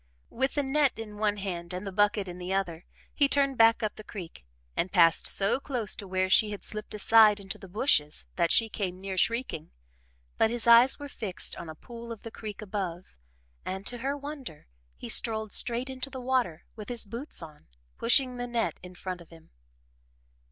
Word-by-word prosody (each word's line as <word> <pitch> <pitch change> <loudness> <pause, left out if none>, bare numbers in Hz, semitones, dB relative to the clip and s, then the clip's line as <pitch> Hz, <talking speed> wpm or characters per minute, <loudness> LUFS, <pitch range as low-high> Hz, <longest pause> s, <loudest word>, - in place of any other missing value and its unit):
With 265 +3 0
the 290 - +1
net 275 -1 +2
in 215 -2 -7
one 210 -1 +1
hand 180 -3 -4
and 185 +3 -5
the 195 - -4
bucket 205 0 +2
in 180 0 -7
the 180 +1 -5
other, 180 -4 -2 0.3
he 285 - +4
turned 275 -1 +2
back 225 0 +5
up 215 - -2
the 215 - -7
creek 170 - -9 0.3
and 180 - 0
passed 165 -3 +5
so 200 +6 +1
close 245 -7 -1
to 200 - -7
where 185 0 0
she 210 +3 +5
had 205 -1 -6
slipped 215 0 -6
aside 215 0 +6
into 195 -1 -7
the 195 - -11
bushes 180 - +1
that 170 -2 +2
she 225 - +5
came 190 -4 -4
near 195 0 -5
shrieking, 230 -5 0 0.7
but 220 - +5
his 235 0 -2
eyes 235 +3 +7
were 290 - -7
fixed 210 -9 -3
on 170 - -8
a 155 - -7
pool 235 +6 -10
of 225 - -7
the 230 - -7
creek 215 -1 -7
above 185 -4 -5 0.5
and, 190 +1 -5
to 245 +3 -4
her 275 +4 -2
wonder, 280 - -8 0.3
he - - -7
strolled 220 -2 +1
straight 240 +2 +1
into 265 +1 -5
the 260 -1 -7
water, 250 -10 0
with 215 0 -8
his 240 -2 +1
boots 235 - -5
on, 155 -2 -13 0.3
pushing 250 +1 +4
the 245 0 -3
net 235 -1 -1
in 180 0 -11
front 180 0 -5
of 170 - -15
him. 165 -1 -17
215 Hz, 200 wpm, -29 LUFS, 185-240 Hz, 0.7 s, eyes